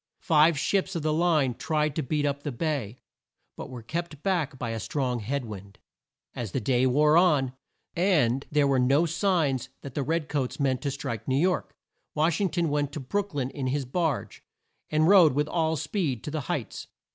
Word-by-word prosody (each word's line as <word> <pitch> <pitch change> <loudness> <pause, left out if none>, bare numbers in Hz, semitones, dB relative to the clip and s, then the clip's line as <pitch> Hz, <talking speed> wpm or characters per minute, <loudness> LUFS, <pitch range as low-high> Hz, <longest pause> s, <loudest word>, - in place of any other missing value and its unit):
Five 155 0 +4
ships 190 +5 0
of 165 - -2
the 155 0 +1
line 155 -6 +2
tried 150 +3 -1
to 160 - 0
beat 145 +2 -1
up 140 0 -1
the 145 - -4
bay, 130 -4 -3 0.6
but - - -8
were 125 -3 -8
kept 160 +2 -5
back 165 -8 0
by 120 -2 -3
a 115 - -3
strong 125 -1 -2
head 130 +5 -3
wind. 100 -2 -9 0.6
As 115 -6 -5
the - - 0
day 125 +2 +2
wore 150 +4 +4
on, 150 -8 +3 0.4
and 150 -9 +2
there 150 -1 +3
were 135 -2 +2
no 135 +6 +3
signs 160 - 0
that 140 - -8
the 145 - -1
red 155 +3 -1
coats 140 -3 -2
meant 135 -2 +1
to 145 - -1
strike 135 -4 -5
New 130 0 +1
York, 180 +4 0 0.4
Wash 160 +4 +1
ing 195 - +2
ton 170 0 0
went 145 -1 0
to 150 - -4
Brook 200 +7 -3
lyn 135 -2 -1
in 135 -3 -4
his 135 +1 -1
barge, 135 - -2 0.5
and 155 +1 +2
rode 180 -6 +7
with 145 +2 0
all 160 -1 0
speed 145 - -2
to 150 - -5
the 155 0 -2
Heights. - - -4
145 Hz, 200 wpm, -27 LUFS, 130-160 Hz, 0.6 s, rode